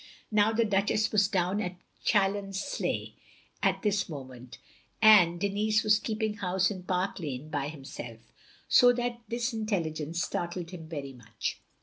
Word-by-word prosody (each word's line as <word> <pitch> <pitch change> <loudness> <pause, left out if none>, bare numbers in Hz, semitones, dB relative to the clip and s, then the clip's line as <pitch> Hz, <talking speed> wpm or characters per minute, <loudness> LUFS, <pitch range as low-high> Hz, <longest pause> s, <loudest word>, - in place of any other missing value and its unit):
" - - -28
Now 210 0 +4
the 225 +1 +2
Duchess 205 +1 +1
was 200 -2 +4
down 190 0 0
at 180 -3 -4 0.3
Challonsleigh, 195 +3 0 0.5
at - - +1
this 205 -3 +1
moment, 130 -4 -9 0.4
and 190 -6 +7
Denis 210 +2 +1
was 210 0 +4
keeping 220 -1 -2
house 185 -1 +1
in 190 -3 -6
Park 185 +1 -1
Lane 145 -2 -5
by 145 -2 -2
himself, 120 -6 -9 0.3
so 245 0 +7
that 240 -1 -3
this 235 +2 -2
intelligence 170 -7 -2
startled 175 0 -4
him 165 -4 -9
very 140 -4 -5
much. 115 -3 -5
195 Hz, 145 wpm, -29 LUFS, 160-215 Hz, 0.5 s, and